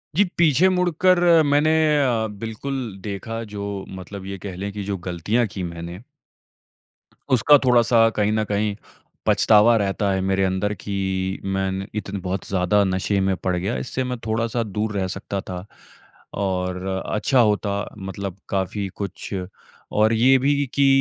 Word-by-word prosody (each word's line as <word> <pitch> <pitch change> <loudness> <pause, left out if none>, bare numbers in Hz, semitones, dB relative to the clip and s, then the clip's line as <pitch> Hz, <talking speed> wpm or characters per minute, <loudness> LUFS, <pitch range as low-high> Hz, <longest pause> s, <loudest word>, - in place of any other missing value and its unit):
जी 205 - +5
पीछे 170 +1 +5
मुड़कर 180 0 +3 0.3
मैंने 145 +2 +3 0.3
अ 115 -4 +1 0.2
बिल्कुल 115 +5 -4 0.3
देखा 110 +3 -5
जो 100 - -4 0.4
मतलब 95 +1 -8
ये 100 0 -5
कह 90 - -6
लें 100 +2 -4
की 105 -1 -5
जो 100 -1 -3
गलतियाँ 105 +8 0
की 95 -1 -6
मैंने 85 +1 -6 1.3
उसका 145 +5 +6
थोड़ा-सा 120 -2 +5
कहीं 105 0 +2
न 110 0 +1
कहीं 105 0 0 0.5
पछतावा 110 +2 +5
रहता 100 -1 0
है 95 0 0
मेरे 95 0 +1
अंदर 95 +2 0
कि 100 -1 -6 0.5
मैंने 95 0 -2
इतने 100 -1 -4
बहुत 95 +1 -3
ज़्यादा 100 +2 +2
नशे 95 +2 0
में 95 0 +1
पड़ 90 0 -2
गया, 95 +7 -2
इससे 130 +1 -3
मैं 125 -1 -3
थोड़ा-सा 115 +1 0
दूर 105 +1 -3
रह 95 -1 0
सकता 100 +1 -4
था। 90 0 -7 0.7
और 90 -1 -2 0.2
अच्छा 125 +5 +1
होता 105 -3 +2 0.2
मतलब 95 -1 -6
काफ़ी 100 +1 -1
कुछ 100 +1 -5 0.6
और 110 +2 +4
ये 130 +4 +5
भी 140 +2 +2
कि 140 -1 +4
105 Hz, 150 wpm, -22 LUFS, 95-115 Hz, 1.3 s, उसका